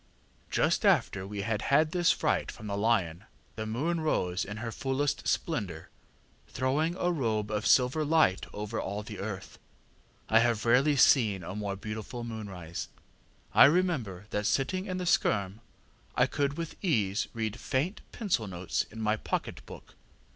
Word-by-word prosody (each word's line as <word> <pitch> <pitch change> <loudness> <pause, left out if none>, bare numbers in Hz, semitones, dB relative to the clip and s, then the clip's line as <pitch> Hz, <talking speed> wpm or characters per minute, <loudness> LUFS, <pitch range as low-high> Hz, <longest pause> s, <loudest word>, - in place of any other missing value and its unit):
ŌĆ£Just - - +2
after 95 -1 +2
we 100 0 -4
had 110 0 -1
had 155 +3 +3
this 175 -1 +3
fright - - 0
from 110 - -11
the 100 -1 -3
lion, 100 -4 +1 0.3
the 110 -1 -4
moon 155 +10 -1
rose 90 - 0
in 105 +1 -6
her 115 +1 -4
fullest 135 +4 -1
splendour, 95 - -2 0.6
throwing 150 +7 0
a 180 -1 0
robe 110 -9 -1
of 105 0 -1
silver 130 +5 +4
light 150 - +3
over 105 +2 -4
all 100 +2 -4
the 105 -1 -8
earth. 100 -2 -6 0.7
I 110 - +5
have 115 -1 +1
rarely 135 +6 +4
seen 110 -8 +4
a 90 - -6
more 100 -1 -3
beautiful 110 +4 -6
moonrise. 100 -8 -6 0.7
I - - +9
remember 140 - +1
that 105 0 0
sitting 135 - 0
in 185 -1 -3
the 180 - -3
skerm 100 - +1 0.6
I - - +4
could 140 0 -1
with 165 +3 -6
ease 105 - +1
read 110 0 -3
faint 145 +9 -1
pencil 185 - -1
notes 90 -1 -2
in 110 +1 -8
my 110 0 +1
pocket - - -3
book. - - -12
110 Hz, 160 wpm, -29 LUFS, 100-145 Hz, 0.7 s, I